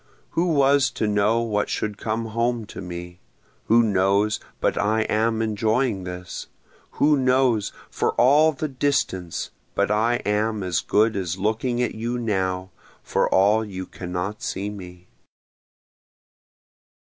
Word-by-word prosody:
Who 175 +2 +1
was 140 -3 +4
to - - -1
know 105 +2 +2
what 105 -3 -1
should 105 -1 -3
come 110 +1 -2
home 115 0 0
to 105 - -9
me? 90 -1 -8 0.5
Who 115 +2 +5
knows 100 +1 +2 0.2
but - - +1
I 110 +2 +1
am 110 +1 +1
enjoying 110 -1 0
this? 90 0 -7 0.5
Who 150 0 +3
knows, 130 -5 +2 0.2
for - - 0
all 150 +6 +5
the 155 +1 -3
distance, 130 - -1 0.2
but - - +1
I 115 +3 +2
am 105 0 0
as 90 -3 0
good 110 +2 +2
as 95 -2 -2
looking 115 +5 0
at - - -1
you 120 +2 -3
now, 95 -5 -1 0.3
for - - +1
all 105 +4 +4
you 95 -3 -6
cannot 90 +4 -5
see 100 +2 -3
me? 90 -3 -10
110 Hz, 135 wpm, -23 LUFS, 95-120 Hz, 0.5 s, Who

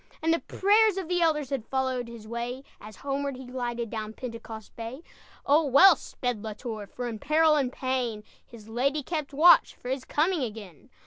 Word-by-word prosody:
And 325 +1 +3
the 335 - +1
prayers 415 +1 +3
of 380 -4 -3
the 355 0 0
elders 300 -5 +1
Had 260 -5 -3
followed 260 -2 -1
his 230 -2 -11
way, 240 +3 -4 0.2
As 215 +1 -11
homeward 280 0 -3
he 260 - -9
glided, 240 -2 -4
Down 220 -1 -5
Pentecost 230 -3 -8
Bay. 235 +7 -7 0.4
Oh, 300 +3 +4
well 320 +7 +8
sped 245 -7 -4
La 220 -1 -5
Tour! 220 -2 -6
For, 245 +4 -6
in 225 -2 -5
peril 310 +3 +3
and 270 -4 +1
pain, 255 -5 -2 0.2
His 220 -3 -14
lady 275 +6 0
kept 305 -1 -4
watch, 320 +5 +6
For 245 - -9
his 260 0 -2
coming 325 +4 +1
again. 210 - -7
255 Hz, 190 wpm, -27 LUFS, 230-300 Hz, 0.4 s, well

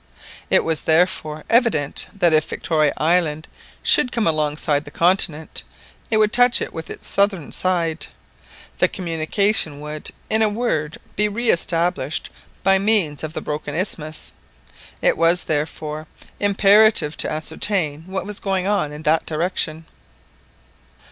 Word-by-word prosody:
It - - +4
was, 160 -2 0
therefore, 160 -2 +1
evident 225 - +2
that 175 -5 +2
if 155 -1 +2
Victoria 155 -3 +1
Island 160 -1 0 0.4
should 250 - +4
come 230 -2 -1
alongside 150 -2 0
of 145 - -5
the - - -9
continent, 170 -3 +1 0.5
it 220 - +3
would 215 0 +2
touch 245 0 +4
it - - -5
with 160 0 -7
its - - -4
southern 200 -6 +1
side,—the 170 -3 -3
communication 170 -1 +1
would, 150 0 -3 0.2
in 220 0 +1
a 220 - +4
word, 205 -9 -2 0.2
be 210 +1 +2
re 235 +3 +1
established 165 -4 -1 0.3
by 195 0 +4
means 195 -9 +1
of 155 0 -5
the - - -4
broken 150 0 -5
isthmus; 160 -4 -2 0.7
it - - +3
was, 170 +2 +3
therefore, 155 0 -3 0.3
imperative 205 -4 +4
to - - 0
ascertain 160 0 -1
what 190 0 -4
was 210 0 -5
going 190 -2 -1
on 200 -7 0
in 150 +1 -9
that 160 +1 +1
direction. 160 -1 -2
165 Hz, 140 wpm, -20 LUFS, 155-200 Hz, 0.7 s, It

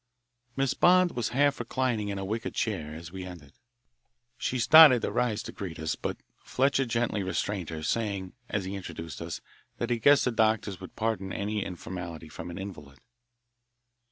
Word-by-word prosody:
Miss 135 -2 +1
Bond 180 0 +5
was 120 -3 -2
half 140 +2 +2
reclining 120 -3 -1
in 100 - -3
a 95 - -3
wicker 110 +4 -2
chair 80 -9 -3
us 85 0 -9
we 95 0 -6
entered. 85 -6 -10 0.8
She 125 +2 -2
started 150 -1 +8
to - - 0
rise 110 -3 0
to - - -7
greet 90 -5 -6
us, 80 0 -2
but - - -4 0.2
Fletcher 135 0 +1
gently 115 -3 0
restrained 95 -1 -2
her, 80 -1 -5
saying, 100 -1 -2 0.2
as 105 -3 -1
he 95 - -4
introduced 85 -5 -7
us, 85 0 -5 0.4
that 120 +1 -2
he 120 - +1
guessed 140 +4 +5
the 125 - +2
doctors 110 -4 +1
would 95 - -10
pardon 110 -4 -1
any 105 +1 -2
informality 85 -3 -7
from 85 - -8
an 85 - -7
invalid. 75 -8 -8
105 Hz, 175 wpm, -28 LUFS, 90-120 Hz, 0.8 s, started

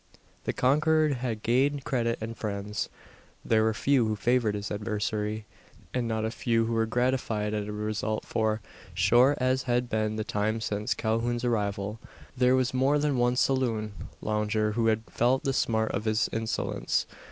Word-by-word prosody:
The - - +1
conqueror 155 +4 +3
had 120 -5 -3
gained 135 +4 +2
credit 115 -3 0
and 115 +1 -5
friends. 105 -1 -3 0.6
There 110 -1 +3
were 110 0 +2
few 130 -2 +2
who 110 - 0
favoured 115 -1 +1
his 100 0 -4
adversary; 105 0 -2 0.5
and 125 -2 0
not 110 -1 -1
a 110 - -2
few 115 -1 +1
who 115 - -2
were 115 0 +1
gratified 115 -3 0
at 105 -1 -2
the - - -4
result 105 +1 -2
for, 110 -1 0 0.3
short 125 +4 +4
as 130 +1 +2
had 120 0 +1
been 110 0 0
the 110 - -2
time 105 +2 -1
since 105 -1 -1
Calhoun's 120 +2 -1
arrival, 105 -2 -1 0.4
there 125 0 +4
was 130 -1 +1
more 135 +3 +3
than 145 -2 +1
one 120 0 +3
saloon 120 -5 +1 0.3
lounger 105 0 0
who 115 +1 +1
had 110 0 +2
felt 125 +3 +1
the 135 - 0
smart 110 -3 +1
of 105 +3 -3
his 110 0 +2
insolence. 115 0 -1
115 Hz, 170 wpm, -28 LUFS, 110-125 Hz, 0.6 s, short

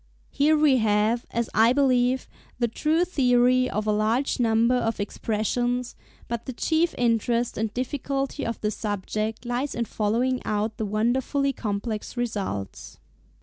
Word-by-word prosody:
Here 305 +2 +3
we 295 -3 +4
have, 220 +1 +1
as 235 -1 -1
I 225 +3 +5
believe, 255 -2 +2 0.3
the 240 -1 +1
true 310 +9 +1
theory 255 -5 +3
of 215 +1 -2
a 215 - +2
large 220 +7 +1
number 230 +1 +3
of 230 -3 0
expressions; 240 +4 -1 0.3
but 235 -1 -4
the 260 - -4
chief 325 +6 +1
interest 235 0 +1
and 220 -1 -2
difficulty 275 +3 -3
of 230 - -3
the 210 - 0
subject 215 +2 -3
lies 245 +4 -2
in 235 - -1
following 235 +5 0
out 215 +1 -2
the 215 - -2
wonderfully 260 +6 0
complex 215 +1 -4
results. 200 - -4
235 Hz, 145 wpm, -25 LUFS, 215-255 Hz, 0.3 s, I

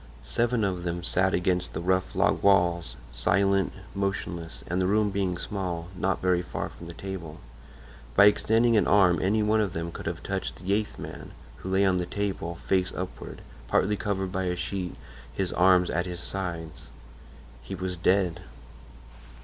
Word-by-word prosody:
Seven 120 - 0
of 95 -3 -1
them 85 0 -3
sat 95 +2 +2
against 90 0 0
the - - -3
rough 95 +2 0
log - - +2
walls, 90 -4 +3 0.2
silent, 100 -1 +2 0.2
motionless, 95 -4 -3
and 90 +2 -1
the 90 - +2
room 105 +1 +2
being 95 -3 -1
small, 90 -4 -4
not 95 +1 -1
very 90 -1 +3
far 90 - -4
from 85 - -11
the 85 - -9
table. 95 -5 -7 0.8
By 100 - +8
extending 115 +3 +4
an 105 - +3
arm 90 -5 +5
any 105 +3 +2
one 110 +1 +3
of 100 -4 -1
them 85 0 -3
could - - -7
have - - -4
touched - - -3
the 95 +2 -2
eighth 105 0 -1
man, - - -8 0.2
who 85 +6 -7
lay 95 +1 +3
on 95 -1 +3
the 90 -1 -2
table, 95 -4 -3
face 95 -1 +2
upward, - - -6 0.3
partly 105 +2 +2
covered 95 -3 -2
by 95 0 -1
a 90 0 0
sheet, 90 0 -3 0.4
his 95 -2 -2
arms 90 0 +4
at 85 +2 -1
his 90 -1 -5
sides. 85 -4 -5 0.7
He 60 +10 -6
was 90 0 -3
dead. 90 0 +1
95 Hz, 175 wpm, -27 LUFS, 90-100 Hz, 0.8 s, By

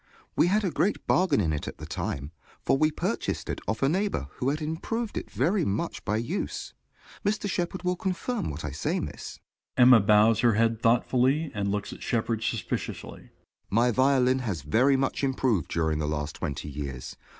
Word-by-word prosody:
We - - +4
had 210 +4 +2
a 185 - 0
great 175 +8 0
bargain 180 - +3
in 80 -6 +1
it 75 - -3
at - - -6
the - - -8
time, 70 +2 -4 0.3
for - - +2
we 155 +3 +3
purchased 155 - -2
it - - -5
of 110 +6 -1
a - - +5
neighbor 190 - 0
who 130 - 0
had 150 +2 -1
improved 190 +9 -3
it - - -4
very 185 +1 +1
much 100 +2 -2
by 105 +1 0
use. 150 - -3 0.5
Mr. 205 0 0
Shepard 180 -1 -2
will 180 0 +1
confirm 190 - -2
what 75 +1 -5
I 75 - -3
say, 75 - -1
Miss. - - -7 0.4
(Emma 125 -1 +8
bows 105 +2 +5
her 120 0 +4
head 115 0 +2
thoughtfully, 130 +6 +2
and 100 -1 -1
looks 105 0 -3
at - - -12
Shepard 115 -2 -1
suspiciously.) 110 -5 -3
JOHN - - -17
S. - - -28 0.4
My 120 +4 +3
violin 130 +1 +3
has 100 - -3
very 125 - +3
much 135 +1 -1
improved 130 - +1
during 80 -2 0
the 75 - -1
last 75 -1 -2
twenty 75 -4 -4
years. 70 -3 -6
120 Hz, 195 wpm, -27 LUFS, 100-155 Hz, 0.5 s, Emma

